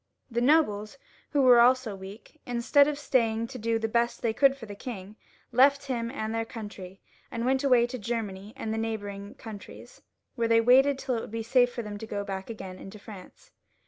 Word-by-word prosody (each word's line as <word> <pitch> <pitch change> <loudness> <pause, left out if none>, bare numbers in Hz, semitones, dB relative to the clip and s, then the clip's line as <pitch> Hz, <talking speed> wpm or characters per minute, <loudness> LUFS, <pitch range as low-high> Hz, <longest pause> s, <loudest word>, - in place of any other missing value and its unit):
The 235 +1 0
nobles, 245 -5 +2 0.3
who 285 -2 +2
were 250 -2 +7
also 250 -3 +3
weak, 195 +10 -12
instead 245 +4 +4
of 300 -1 -2
staying 230 -5 +1
to 255 - -8
do 230 +1 0
the 225 0 -1
best 235 +1 0
they 230 -2 +1
could 275 +3 +4
for 240 - -9
the 205 - -8
king, 205 -2 -8 0.4
left 275 +3 +4
him 235 -4 -2
and 220 -4 -4
their 225 0 0
country, 205 -5 -9 0.3
and 230 0 -3
went 265 +1 +1
away 250 -4 +5
to 245 +1 -6
Germany 210 -3 -4
and 225 -5 -4
the 225 - -2
neighbouring 205 -3 -5
countries, 215 -3 -11 0.3
where 235 -3 0
they 230 0 +5
waited 260 +4 +5
till 255 -2 -2
it - - -3
should - - -8
be 225 +1 -4
safe 245 +1 +3
for 240 -1 -5
them 205 -1 -7
to 220 - -7
go 205 -2 -3
back 195 0 -6
again 190 -4 -8
into 195 +2 -10
France. 210 - -13
230 Hz, 210 wpm, -28 LUFS, 210-255 Hz, 0.4 s, were